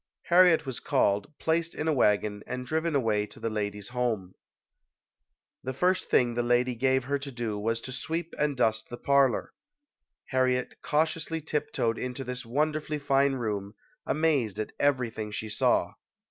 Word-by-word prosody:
Harriet 175 Hz, -3 st, +6 dB
was 130 Hz, -3 st, -4 dB
called, 100 Hz, +6 st, +1 dB
placed 165 Hz, +1 st, 0 dB
in 155 Hz, -, -2 dB
a 160 Hz, -, +3 dB
wagon 105 Hz, -4 st, +2 dB
and 125 Hz, 0 st, -4 dB
driven 160 Hz, +2 st, -1 dB
away 110 Hz, -5 st, +1 dB
to 105 Hz, -, -13 dB
the 115 Hz, -, -2 dB
lady's 105 Hz, -1 st, -3 dB
home. 115 Hz, -7 st, -2 dB, 1.3 s
The 130 Hz, 0 st, -4 dB
first 180 Hz, +5 st, +1 dB
thing 120 Hz, -1 st, +3 dB
the 120 Hz, -, 0 dB
lady 120 Hz, +1 st, +2 dB
gave 130 Hz, +2 st, +2 dB
her 140 Hz, +2 st, -1 dB
to 140 Hz, 0 st, -7 dB
do 115 Hz, -4 st, -3 dB
was 115 Hz, +2 st, 0 dB
to 130 Hz, -, -7 dB
sweep 160 Hz, +6 st, -4 dB
and 150 Hz, -2 st, +1 dB
dust 110 Hz, -2 st, +1 dB
the 120 Hz, -, -6 dB
parlor. 140 Hz, -2 st, +2 dB, 0.8 s
Harriet 130 Hz, -1 st, 0 dB
cautiously 160 Hz, +1 st, 0 dB
tiptoed 145 Hz, -7 st, -1 dB
into 125 Hz, +2 st, -4 dB
this 125 Hz, -2 st, -5 dB
wonderfully 150 Hz, +4 st, 0 dB
fine 140 Hz, -1 st, +2 dB
room, 105 Hz, -5 st, -3 dB, 0.3 s
amazed 140 Hz, -9 st, +1 dB
at 110 Hz, -, -3 dB
everything 120 Hz, -6 st, 0 dB
she 110 Hz, +1 st, -4 dB
saw. 105 Hz, -, +2 dB
125 Hz, 160 wpm, -28 LUFS, 115-150 Hz, 1.3 s, Harriet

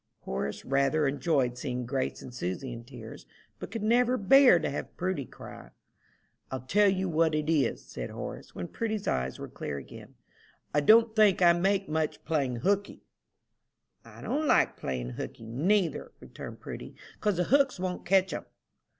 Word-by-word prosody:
Horace 65 Hz, +2 st, -4 dB
rather 140 Hz, +2 st, +2 dB
enjoyed 135 Hz, -4 st, 0 dB
seeing 125 Hz, -2 st, -3 dB
Grace 130 Hz, +2 st, -2 dB
and 125 Hz, -, -10 dB
Susy 120 Hz, +4 st, -4 dB
in 115 Hz, 0 st, -8 dB
tears, 120 Hz, -4 st, -11 dB, 0.3 s
but -, -, -7 dB
could 220 Hz, +1 st, -5 dB
never 245 Hz, +3 st, +3 dB
bear 250 Hz, +1 st, +7 dB
to 160 Hz, -, -1 dB
have 140 Hz, -, -5 dB
Prudy 180 Hz, -6 st, -2 dB
cry. -, -, -11 dB, 0.8 s
"I'll 130 Hz, -, -4 dB
tell 205 Hz, +11 st, +3 dB
you 190 Hz, 0 st, 0 dB
what 160 Hz, -2 st, +2 dB
it 150 Hz, 0 st, -1 dB
is," 140 Hz, -7 st, +1 dB
said -, -, -6 dB
Horace, -, -, -8 dB
when 90 Hz, -, -4 dB
Prudy's 220 Hz, -3 st, -3 dB
eyes 65 Hz, 0 st, -1 dB
were -, -, -7 dB
clear 70 Hz, -, -5 dB
again, 70 Hz, -, -11 dB, 0.6 s
"I 145 Hz, -, +4 dB
don't 220 Hz, +8 st, +5 dB
think 205 Hz, -4 st, +5 dB
I 170 Hz, -1 st, +7 dB
make 195 Hz, +3 st, +1 dB
much 155 Hz, 0 st, -2 dB
playing 135 Hz, -7 st, -1 dB
hookey." 200 Hz, +1 st, 0 dB, 1.0 s
"I -, -, -13 dB
don't 305 Hz, +1 st, -1 dB
like -, -, +3 dB
playing 60 Hz, -2 st, -4 dB
'hookey' 115 Hz, -, -6 dB
neither," 170 Hz, -, 0 dB
returned -, -, -10 dB
Prudy, -, -, -8 dB, 0.2 s
"'cause 210 Hz, -4 st, 0 dB
the 180 Hz, -, +2 dB
hooks 270 Hz, 0 st, +3 dB
won't 180 Hz, -1 st, -3 dB
catch 190 Hz, 0 st, +3 dB
'em." -, -, -5 dB
160 Hz, 165 wpm, -29 LUFS, 125-200 Hz, 1.0 s, bear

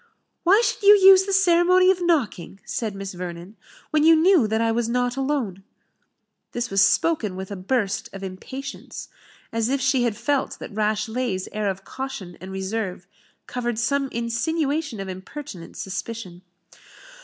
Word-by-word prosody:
"Why 390 Hz, +5 st, +5 dB
should -, -, -1 dB
you 410 Hz, +1 st, +8 dB
use 385 Hz, -1 st, +7 dB
the 395 Hz, -, -3 dB
ceremony 365 Hz, 0 st, +5 dB
of 370 Hz, -1 st, -2 dB
knocking," 265 Hz, -, 0 dB
said 220 Hz, -6 st, -3 dB
Miss 195 Hz, 0 st, -6 dB
Vernon, 175 Hz, +2 st, -7 dB, 0.4 s
"when 305 Hz, -1 st, +3 dB
you 325 Hz, +1 st, +7 dB
knew 325 Hz, -, +4 dB
that 220 Hz, +1 st, 0 dB
I 230 Hz, 0 st, +2 dB
was 230 Hz, 0 st, 0 dB
not 245 Hz, 0 st, 0 dB
alone?" 265 Hz, -9 st, -2 dB, 0.9 s
This 240 Hz, -2 st, -3 dB
was 195 Hz, 0 st, +3 dB
spoken 215 Hz, -, +2 dB
with 190 Hz, +1 st, -7 dB
a -, -, -3 dB
burst 205 Hz, +1 st, -1 dB
of 195 Hz, 0 st, -9 dB
impatience, 260 Hz, +9 st, -7 dB, 0.4 s
as 230 Hz, 0 st, 0 dB
if 275 Hz, +1 st, +1 dB
she 265 Hz, -1 st, +2 dB
had 235 Hz, -4 st, 0 dB
felt 285 Hz, -2 st, -1 dB
that -, -, -9 dB
Rashleigh's 215 Hz, -1 st, -1 dB
air 210 Hz, -1 st, -1 dB
of 195 Hz, 0 st, -5 dB
caution 235 Hz, -10 st, -6 dB
and 190 Hz, +1 st, -8 dB
reserve 190 Hz, -1 st, -4 dB, 0.4 s
covered 240 Hz, -2 st, -3 dB
some 275 Hz, +4 st, 0 dB
insinuation 275 Hz, +3 st, -2 dB
of 195 Hz, -, -5 dB
impertinent 190 Hz, -, -8 dB
suspicion. 195 Hz, -2 st, -6 dB
235 Hz, 155 wpm, -23 LUFS, 195-290 Hz, 0.9 s, you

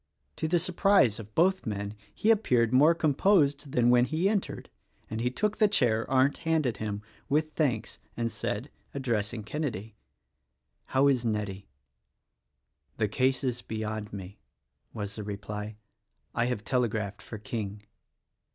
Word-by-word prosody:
To 160 Hz, -, -1 dB
the 175 Hz, +2 st, +3 dB
surprise 180 Hz, -, +3 dB
of 105 Hz, -1 st, -11 dB
both 190 Hz, 0 st, +3 dB
men 100 Hz, -1 st, -3 dB, 0.2 s
he 220 Hz, -, +2 dB
appeared 125 Hz, -, +3 dB
more 150 Hz, +6 st, +6 dB
com 155 Hz, -3 st, +2 dB
posed 145 Hz, -5 st, +3 dB
than 120 Hz, 0 st, +4 dB
when 125 Hz, 0 st, +5 dB
he 155 Hz, +8 st, +1 dB
entered; 205 Hz, -1 st, -2 dB, 0.4 s
and 110 Hz, +1 st, -2 dB
he 125 Hz, -, +1 dB
took 210 Hz, +11 st, -1 dB
the 215 Hz, -, +5 dB
chair 115 Hz, -, +1 dB
Arndt 135 Hz, +1 st, +3 dB
handed 160 Hz, -8 st, +1 dB
him, 105 Hz, -1 st, -4 dB, 0.3 s
with 155 Hz, +2 st, +1 dB
thanks 125 Hz, -8 st, -1 dB, 0.2 s
and 115 Hz, -1 st, -1 dB
said, 110 Hz, +4 st, -3 dB
— -, -, -39 dB
addressing 115 Hz, -4 st, -1 dB
Kenedy, 110 Hz, -4 st, -4 dB, 0.5 s
— 60 Hz, +1 st, -51 dB
"How 135 Hz, +2 st, +5 dB
is 130 Hz, -4 st, +3 dB
Nettie?" 105 Hz, -3 st, -2 dB, 1.3 s
"The 110 Hz, -, +2 dB
case 130 Hz, +5 st, +1 dB
is 125 Hz, -2 st, -1 dB
beyond 110 Hz, -1 st, -4 dB
me," 100 Hz, 0 st, -8 dB, 0.5 s
was 100 Hz, -2 st, -5 dB
the 105 Hz, -, -4 dB
reply, 105 Hz, +1 st, -5 dB, 0.6 s
"I 120 Hz, -, +1 dB
have 125 Hz, -4 st, -2 dB
tele 125 Hz, -1 st, +1 dB
graphed 105 Hz, -2 st, -4 dB
for 110 Hz, -, -8 dB
King." 105 Hz, -1 st, -5 dB
120 Hz, 155 wpm, -29 LUFS, 105-145 Hz, 1.3 s, more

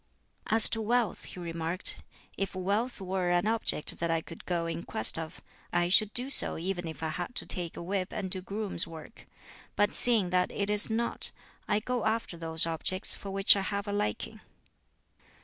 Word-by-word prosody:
As 225 Hz, 0 st, +8 dB
to 225 Hz, -, -1 dB
wealth, 235 Hz, +1 st, -1 dB
he -, -, -9 dB
remarked, 170 Hz, +1 st, -1 dB, 0.3 s
"If 195 Hz, -1 st, -4 dB
wealth 205 Hz, +7 st, -2 dB
were 185 Hz, -1 st, -2 dB
an 175 Hz, +2 st, +1 dB
object 220 Hz, -8 st, +1 dB
that 170 Hz, -, -1 dB
I 165 Hz, 0 st, +1 dB
could 165 Hz, 0 st, -12 dB
go 170 Hz, -2 st, -1 dB
in 165 Hz, 0 st, -4 dB
quest 110 Hz, +3 st, +4 dB
of, 160 Hz, -1 st, -8 dB, 0.3 s
I 175 Hz, 0 st, +1 dB
should 210 Hz, +3 st, +5 dB
do 255 Hz, +3 st, -1 dB
so -, -, +5 dB
even 175 Hz, 0 st, -4 dB
if 160 Hz, 0 st, -8 dB
I 160 Hz, -, -1 dB
had 175 Hz, +9 st, -5 dB
to -, -, -1 dB
take 175 Hz, -2 st, -1 dB
a -, -, -6 dB
whip 185 Hz, +1 st, -3 dB
and 190 Hz, -2 st, -5 dB
do 185 Hz, -, +1 dB
grooms' 200 Hz, -2 st, -3 dB
work. 165 Hz, +5 st, -12 dB, 0.5 s
But 205 Hz, 0 st, +1 dB
seeing 220 Hz, -7 st, +3 dB
that 180 Hz, 0 st, +1 dB
it 200 Hz, 0 st, -2 dB
is 210 Hz, +2 st, +1 dB
not, 230 Hz, +1 st, +1 dB, 0.4 s
I 210 Hz, 0 st, +1 dB
go 245 Hz, 0 st, -3 dB
after 220 Hz, -5 st, -2 dB
those 165 Hz, -1 st, +3 dB
objects 175 Hz, +4 st, 0 dB
for 200 Hz, -, -4 dB
which 195 Hz, +1 st, +4 dB
I 200 Hz, -, -1 dB
have 200 Hz, +1 st, -4 dB
a 205 Hz, -, -3 dB
liking." 105 Hz, -, -3 dB
190 Hz, 195 wpm, -29 LUFS, 170-210 Hz, 0.5 s, As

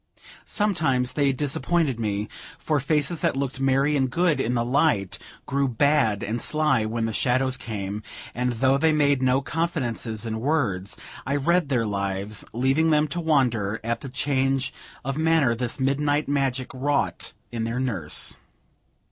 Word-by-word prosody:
Sometimes 155 Hz, -, +1 dB
they 140 Hz, -2 st, +2 dB
disappointed 140 Hz, 0 st, 0 dB
me, 105 Hz, -1 st, -1 dB, 0.3 s
for 150 Hz, -2 st, 0 dB
faces 150 Hz, +3 st, +1 dB
that -, -, +1 dB
looked 135 Hz, -1 st, -2 dB
merry 135 Hz, +2 st, +2 dB
and 130 Hz, -2 st, +1 dB
good 165 Hz, +3 st, +1 dB
in 120 Hz, +2 st, 0 dB
the 120 Hz, 0 st, +1 dB
light, 125 Hz, -, +1 dB, 0.3 s
grew 140 Hz, +1 st, 0 dB
bad 120 Hz, -4 st, +2 dB
and 115 Hz, +3 st, -2 dB
sly 150 Hz, -7 st, +2 dB
when 115 Hz, +1 st, -1 dB
the 115 Hz, -, -2 dB
shadows 130 Hz, +3 st, +1 dB
came; 105 Hz, -4 st, -5 dB, 0.3 s
and 125 Hz, +1 st, -1 dB
though 130 Hz, +4 st, +2 dB
they 160 Hz, +1 st, +3 dB
made 145 Hz, -3 st, +3 dB
no 130 Hz, +1 st, +3 dB
confidences 130 Hz, -9 st, -2 dB
in 110 Hz, -1 st, -3 dB
words, 110 Hz, -9 st, -1 dB, 0.3 s
I 140 Hz, -, -1 dB
read 170 Hz, +2 st, +2 dB
their 120 Hz, -4 st, +1 dB
lives, 100 Hz, 0 st, -2 dB
leaving 135 Hz, +7 st, +2 dB
them 155 Hz, 0 st, +3 dB
to 175 Hz, +5 st, -2 dB
wonder 120 Hz, -10 st, +1 dB
at 115 Hz, +1 st, -1 dB
the 135 Hz, -, -7 dB
change 135 Hz, 0 st, 0 dB, 0.3 s
of 135 Hz, +2 st, -2 dB
manner 160 Hz, -6 st, +3 dB
this 120 Hz, +3 st, -3 dB
midnight 145 Hz, +2 st, +1 dB
magic 135 Hz, -2 st, -1 dB
wrought 140 Hz, +2 st, -1 dB, 0.2 s
in 115 Hz, -1 st, -3 dB
their 115 Hz, +2 st, -2 dB
nurse. 100 Hz, -13 st, -1 dB
130 Hz, 155 wpm, -25 LUFS, 115-145 Hz, 0.3 s, they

